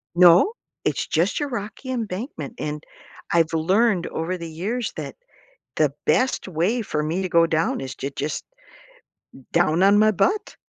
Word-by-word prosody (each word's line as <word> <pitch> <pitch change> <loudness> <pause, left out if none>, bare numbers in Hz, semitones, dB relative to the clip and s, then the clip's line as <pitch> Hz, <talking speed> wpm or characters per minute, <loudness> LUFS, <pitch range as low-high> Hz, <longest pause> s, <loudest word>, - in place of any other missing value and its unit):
No, 180 - +6 0.3
it's - - 0
just - - +1
your 290 -1 -2
rocky 235 +3 -5
embankment, 215 - -4
and 150 0 -4 0.5
I've 165 -1 +2
learned 185 +4 +2
over 175 +3 -3
the 170 -1 -7
years 210 +9 -3
that - - -6 0.6
the - - +2
best 255 -6 +1
way 185 +8 0
for 155 -8 -2
me 160 +5 -1
to 190 - -2
go 170 -1 +4
down 165 -3 0
is 130 -1 -6
to 140 - -4
just 145 +2 -4 1.1
down 170 0 +3
on 200 +2 +6
my 215 0 +5
butt. 410 - 0
180 Hz, 155 wpm, -23 LUFS, 160-220 Hz, 1.1 s, No